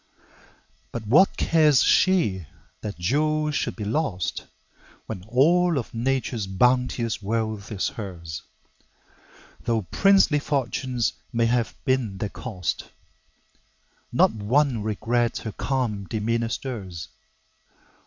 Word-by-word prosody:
But 115 -2 -5
what 150 - +5
cares 155 -5 +4
she 110 - +3 0.3
that 105 -1 -5
jewels 150 - +1
should - - -1
be 105 - -5
lost, 100 - -2 0.6
When 95 -5 -6
all 165 +8 +3
of 120 - -4
Nature's 120 -3 -1
bounteous 125 +3 +1
wealth 110 0 -2
is 100 -3 -1
hers? 85 -7 -7 1.2
Though 115 -2 0
princely 190 - +4
fortunes 130 -4 -1 0.2
may 115 0 +2
have 120 0 0
been 130 -7 0
their 105 +1 -3
cost, 100 -8 -4 1.2
Not - - +4
one 115 +3 +1
regret 115 +3 0
her 110 - -5
calm 115 -4 -2
demeanor 115 +2 -1
stirs. 95 -11 -5
115 Hz, 105 wpm, -25 LUFS, 105-135 Hz, 1.2 s, what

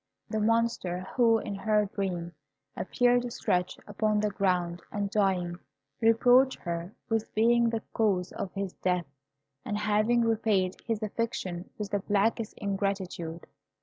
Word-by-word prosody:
The 220 - 0
Monster, 225 -5 +1
who, 230 -3 +5
in 210 - -4
her 210 +1 +2
dream, 185 -4 -3 0.4
appeared 245 +3 +2
stretched 180 -4 -1
upon 210 0 0
the 210 0 0
ground 180 -3 0
and 200 -1 -2
dying, 185 -4 +1 0.4
reproached 245 +4 +5
her 170 +2 -4
with 225 -1 -1
being 235 +2 +4
the 225 -1 -2
cause 195 -5 +1
of 185 - -5
his 195 -1 -3
death, 180 -2 0 0.6
and 210 - -2
having 215 +3 +2
repaid 215 -5 +1
his 225 -2 -1
affection 210 -5 -3
with 210 -2 -5
the 205 - +1
blackest 210 +2 0
ingratitude. 195 -4 -3
205 Hz, 135 wpm, -29 LUFS, 185-225 Hz, 0.6 s, who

